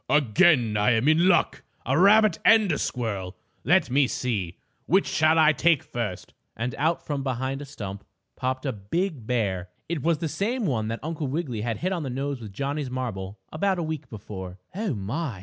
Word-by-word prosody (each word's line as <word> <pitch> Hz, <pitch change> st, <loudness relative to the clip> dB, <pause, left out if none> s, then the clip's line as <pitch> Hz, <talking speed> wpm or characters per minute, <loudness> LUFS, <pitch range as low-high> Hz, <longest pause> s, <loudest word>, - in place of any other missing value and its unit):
Again 130 Hz, -, +4 dB
I 105 Hz, +4 st, +3 dB
am 115 Hz, +5 st, +1 dB
in 160 Hz, +4 st, +5 dB
luck! 180 Hz, -2 st, +3 dB, 0.2 s
A -, -, +1 dB
rabbit 205 Hz, +1 st, +5 dB
and 220 Hz, -5 st, +5 dB
a 150 Hz, -, 0 dB
squirrel! 100 Hz, -7 st, -3 dB, 0.3 s
Let 170 Hz, -2 st, +3 dB
me 135 Hz, 0 st, +4 dB
see; 105 Hz, -8 st, -2 dB, 0.3 s
which 190 Hz, +5 st, +4 dB
shall 155 Hz, +1 st, +3 dB
I 155 Hz, -1 st, +6 dB
take 155 Hz, +1 st, +3 dB
first?" 105 Hz, -7 st, -5 dB, 0.2 s
And 120 Hz, +3 st, -2 dB
out 160 Hz, +3 st, 0 dB
from 145 Hz, -2 st, -2 dB
behind 130 Hz, +1 st, -2 dB
a -, -, -6 dB
stump 100 Hz, -8 st, -7 dB, 0.3 s
popped 130 Hz, +2 st, -2 dB
a 135 Hz, -, 0 dB
big 125 Hz, -, -3 dB
bear. 95 Hz, -7 st, -1 dB, 0.2 s
It 165 Hz, -3 st, -2 dB
was 165 Hz, +2 st, +2 dB
the 165 Hz, +1 st, -2 dB
same 215 Hz, -, -1 dB
one 115 Hz, -, 0 dB
that 115 Hz, +1 st, -4 dB
Uncle 160 Hz, -2 st, -3 dB
Wiggily 130 Hz, -6 st, -3 dB
had 115 Hz, -1 st, -2 dB
hit 185 Hz, -, -2 dB
on 175 Hz, -, -2 dB
the 140 Hz, -, -4 dB
nose 135 Hz, +1 st, -3 dB
with 105 Hz, -3 st, -8 dB
Johnnie's 140 Hz, +5 st, -3 dB
marble, 110 Hz, -6 st, -4 dB
about 190 Hz, +4 st, 0 dB
a 170 Hz, -, -1 dB
week 155 Hz, -2 st, -5 dB
before. 95 Hz, -4 st, -8 dB, 0.2 s
"Oh, 200 Hz, -, -2 dB
my!" 110 Hz, -, -3 dB
135 Hz, 195 wpm, -26 LUFS, 110-160 Hz, 0.3 s, I